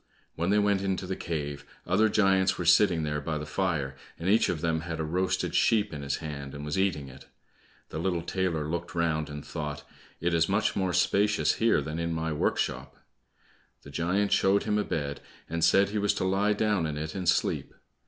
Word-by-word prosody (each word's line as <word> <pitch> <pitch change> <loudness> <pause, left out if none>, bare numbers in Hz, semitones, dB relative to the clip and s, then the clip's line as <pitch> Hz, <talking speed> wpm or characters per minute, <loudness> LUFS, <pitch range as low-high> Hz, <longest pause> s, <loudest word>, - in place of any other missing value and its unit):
When 85 +2 -1
they 105 - +4
went 100 -2 +2
into 95 -1 -1
the 95 +1 -3
cave, 75 -5 -4 0.2
other 110 0 +3
giants 95 -2 +3
were 90 - -3
sitting 85 -1 +5
there 75 -1 -2
by 80 +1 -2
the 75 - -5
fire, 80 -6 -1 0.2
and 85 - -5
each 110 +4 +4
of 80 - -2
them 80 -2 0
had 80 -1 -5
a - - 0
roasted 90 +4 -1
sheep 105 -6 +2
in 75 - -5
his 70 -1 -1
hand 70 -3 -6
and 70 +1 -6
was 75 - -2
eating 90 -8 0
it. 65 0 -13 0.6
The - - -5
little 85 -1 -1
tailor 85 -5 -1
looked 85 +2 -4
round 80 -3 0
and 75 0 -7
thought, 75 -2 -5 0.3
"It 85 +1 0
is 85 +1 +2
much 100 +2 +1
more 95 -2 0
spacious 100 +4 +2
here 115 -9 +4
than 75 +3 -4
in 85 0 -1
my 80 0 -2
workshop." 75 - -1 0.9
The 70 - -11
giant 90 +7 0
showed 100 +1 +3
him 105 -1 +1
a - - +1
bed, 70 -6 -3 0.3
and 85 +1 -2
said 100 +1 +5
he 105 +1 -1
was 105 0 +1
to - - -1
lie 100 +3 +2
down 105 -5 +1
in 75 -1 -4
it 75 +1 -4
and 90 -3 -1
sleep. - - 0
85 Hz, 210 wpm, -28 LUFS, 75-95 Hz, 0.9 s, sitting